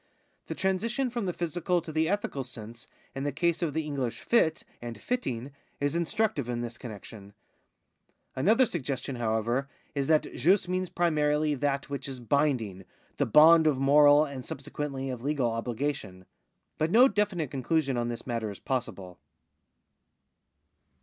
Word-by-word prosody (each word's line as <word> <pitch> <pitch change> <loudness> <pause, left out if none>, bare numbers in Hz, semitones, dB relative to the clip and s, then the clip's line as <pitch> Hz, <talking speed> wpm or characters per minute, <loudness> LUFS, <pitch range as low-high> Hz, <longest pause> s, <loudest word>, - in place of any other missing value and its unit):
The - - -4
transition 230 +7 -1
from 235 -5 -2
the - - +1
physical 175 +1 -1
to 165 -1 -8
the 160 +1 +1
ethical 195 -9 -2
sense 120 -1 -11 0.3
in 135 - -4
the 145 - -1
case 170 +4 0
of 160 -4 -1
the 160 - 0
English 135 -5 -3
fd 160 -9 +2 0.2
and 120 -3 -7
fitting 135 - -3 0.3
is 145 +2 0
instructive 170 - 0
in 120 -1 -2
this 120 0 -5
comiexion. 105 -3 -10 1.0
Another 220 - +4
suggestion, 140 - -4
however, 120 +4 -1 0.2
is 140 -2 -1
that 155 -1 +2
jus 185 +3 +3
means 185 0 -1
primarily 150 -3 +1
that 140 0 -1
which 140 - -4
is 135 -2 -6
binding 120 -7 0 0.2
— - - -36
the - - +2
bond 160 +6 +7
of 145 -4 +2
moral 145 +2 +6
and 140 -3 -7
subsequently 135 0 -5
of 125 -2 -6
legal 135 -3 0
obhgation. 115 -5 -3 0.5
But 155 - +1
no 240 +8 +7
definite 200 - -1
conclusion 140 +1 0
on 120 0 -1
this 120 -1 -5
matter 115 -3 -2
is 100 - -8
possible.' 95 -8 -4
140 Hz, 155 wpm, -28 LUFS, 120-165 Hz, 1.0 s, bond